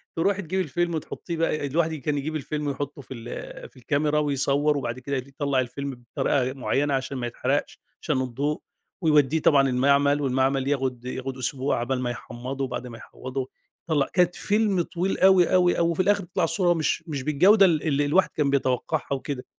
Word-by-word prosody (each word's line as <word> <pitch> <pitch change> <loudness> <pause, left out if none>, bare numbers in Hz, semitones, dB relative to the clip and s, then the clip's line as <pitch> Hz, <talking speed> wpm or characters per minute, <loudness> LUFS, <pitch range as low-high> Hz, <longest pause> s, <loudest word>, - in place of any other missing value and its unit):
ترُوحي 195 +4 +1
تجيبي 190 +2 -1
الفيلم، 170 +2 -1
وتحطّيه 165 +2 -5
بقى 155 -2 0
الواحد 160 +3 0
كان 150 -1 -2
يجيب 155 +3 -3
الفيلم 150 0 -3
ويحطّه 140 0 -4
في 130 - -9
ال 120 -1 -8
في - - -24
الكاميرا 150 +4 0
ويصوّر 145 0 +1
وبعد 120 -2 -3
كده 140 +2 -3
يطلّع 140 +1 -2
الفيلم 130 0 -4
بطريقة 130 -2 +1
معيّنة 140 +2 0
عشان 135 0 -2
ما 120 -1 -2
يتحرقش، 130 +4 -2 0.2
عشان 140 -5 0
الضوء 140 +6 -2 0.4
ويودّيه 150 -2 +3
طبعًا 140 -3 +4
المعمل 140 +3 +3
والمعمل 135 0 +1
ياخد، 130 -3 -1
ياخد 130 +1 -5
أسبوع 130 +2 -1
عقبال 125 +2 -1
ما 125 - -1
يحمّضه، 125 +3 -6
وبعد 125 -1 -4
ما 115 -2 -9
يحمّضه 130 +2 -6 0.4
يطلَّع 145 -4 +2
كانت 180 -1 +3
فيلم 205 -3 +1
طويل 180 +3 -2
أوي، 190 -2 +5
أوي، 180 -1 +4
أوي 170 0 +2
وفي 165 - -5
الآخر 205 +1 +2
تطلع 175 - -2
الصورة 175 +1 +2
مش، 165 0 -1
مش 145 -4 -4
بالجودة 190 +9 +5
ال 165 -5 +2
اللي 145 -2 +1
الواحد 170 +4 +3
كان 150 -2 +1
بيتوقّعها 130 0 0
وكده، 135 -1 -4
140 Hz, 180 wpm, -25 LUFS, 130-160 Hz, 0.4 s, أوي